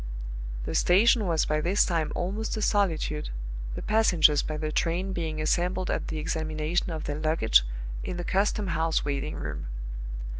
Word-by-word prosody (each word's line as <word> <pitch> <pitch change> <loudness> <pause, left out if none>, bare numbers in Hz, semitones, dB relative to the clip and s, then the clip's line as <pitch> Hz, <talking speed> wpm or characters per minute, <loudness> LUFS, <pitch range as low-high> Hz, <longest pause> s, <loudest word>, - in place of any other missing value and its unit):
The - - -3
station 210 +3 +4
was 165 -2 +2
by 150 0 0
this 185 +6 +3
time 160 -4 0
almost 210 +5 -2
a - - -2
solitude, 165 -8 +1 0.5
the - - -5
passengers 175 -9 +4
by 155 - -4
the 155 0 -2
train 175 +5 0
being 160 -3 -3
assembled 180 +4 0
at - - -2
the 160 - -3
examination 155 +2 -1
of 160 -2 -4
their 145 0 -3
luggage 155 - +4 0.4
in 180 - -4
the 175 - -3
custom 200 +2 +1
house 165 -1 +1
waiting 145 +1 -2
room. - - -5
165 Hz, 160 wpm, -27 LUFS, 155-185 Hz, 0.5 s, station